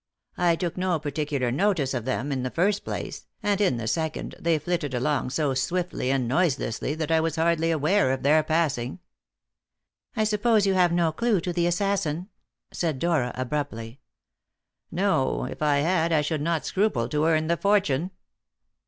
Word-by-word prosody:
I 175 -1 +3
took 175 0 -3
no 180 -2 +1
particular 145 -4 -2
notice 155 -3 +1
of 120 -4 -3
them, 130 +2 -2
in 130 -2 -1
the 130 - -2
first 195 +8 +1
place; - - -6 0.2
and 205 -1 +1
in 185 -12 +2
the 115 - -4
second, 160 +7 -2
they 165 -1 +2
flitted 150 -4 -2
along 130 +2 0
so 145 0 0
swiftly 170 +1 -1
and 135 -3 +1
noiselessly 140 -1 0
that 160 0 -3
I 160 - +4
was 160 -1 -1
hardly 165 0 +1
aware 155 -2 +2
of 130 - -2
their 150 +3 +5
passing." 155 -4 -1 1.2
"I 220 - +1
suppose 215 0 +2
you 195 - +2
have 180 -2 +3
no 170 -2 +2
clue 220 +4 +1
to 175 +1 -3
the 170 0 +1
assassin?" 180 -1 -1 0.4
said 160 -5 -1
Dora 150 -5 +1
abruptly. 130 -3 -4 0.9
"No. 185 -8 +1
If - - -7
I 150 -2 +3
had, 170 +1 +1
I 155 -2 +3
should 150 0 -2
not 165 0 -1
scruple 190 - 0
to 150 +2 +1
earn 160 -1 +2
the 170 +2 +1
fortune." 185 -5 +1
160 Hz, 170 wpm, -25 LUFS, 140-180 Hz, 1.2 s, their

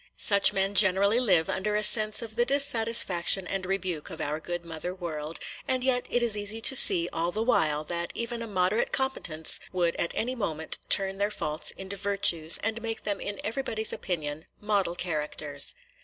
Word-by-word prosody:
Such 200 -1 +4
men 195 +1 -1
generally 200 +3 +4
live 180 -10 +2
under 210 +2 -2
a 210 - 0
sense 215 +2 +6
of 220 -1 -8
the 240 - +2
dissatisfaction 230 -9 +3
and 190 0 -4
rebuke 185 -5 -3
of - - -10
our 150 +1 -3
good 175 +1 -6
mother 170 +2 -7
world; 160 -3 -6 0.3
and 255 -1 -1
yet 255 -1 0
it 245 - 0
is 230 -3 +2
easy 205 +2 0
to 265 - +3
see 170 -8 +5
all 165 +1 -1
the 215 +5 -3
while 155 -11 +1
that 170 +2 -3
even 235 0 -4
a 230 - -6
moderate 190 +2 -1
competence 175 -12 -1
would 175 -2 0
at 170 - -2
any 245 +3 -2
moment 160 -10 -3
turn 195 -1 +3
their 205 +1 0
faults 155 -6 -1
into 190 +1 -4
virtues, 190 -5 +3
and 220 +2 -2
make 225 -1 -6
them 205 -2 -3
in 205 0 -4
everybody's 220 -1 -2
opinion 155 -3 -5
model 200 -4 -1
characters. 155 -4 -3
195 Hz, 185 wpm, -26 LUFS, 170-220 Hz, 0.3 s, sense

